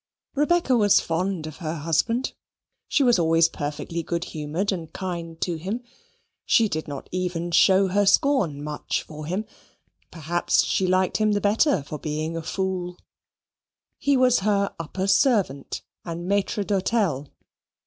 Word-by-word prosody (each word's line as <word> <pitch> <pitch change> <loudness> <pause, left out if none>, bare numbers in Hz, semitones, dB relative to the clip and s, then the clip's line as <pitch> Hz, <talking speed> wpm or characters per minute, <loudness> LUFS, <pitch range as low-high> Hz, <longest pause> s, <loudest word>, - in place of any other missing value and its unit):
Rebecca 295 -1 +2
was 205 -4 +5
fond 170 0 -2
of 155 -1 -8
her 165 -2 -4
husband. 165 - 0 0.5
She 285 - +2
was 240 -6 +4
always 165 0 +4
perfectly 150 +2 -4
good 170 +1 -3
humoured 160 +6 -2
and 170 -5 -5
kind 170 -3 -5
to 175 -3 -1
him. 200 +9 -4 0.6
She 225 - +4
did 155 -5 -4
not 140 -2 -7
even 180 -2 -2
show 190 +3 +5
her 200 +2 +2
scorn 195 - +2
much 150 0 -3
for 155 -1 -9
him; 190 +6 -2 0.6
perhaps 170 +1 +1
she 190 - 0
liked 185 0 +2
him 215 -1 +2
the 205 - +1
better 205 - +2
for 150 +1 -7
being 155 +1 -3
a 165 - -3
fool. 180 0 -3 1.0
He 280 -1 +2
was 255 -1 +4
her 200 0 +1
upper 185 +4 -3
servant 195 - +1 0.2
and 170 0 -5
maitre 200 +1 0
d'hotel. 190 - 0
180 Hz, 150 wpm, -24 LUFS, 160-205 Hz, 1.0 s, was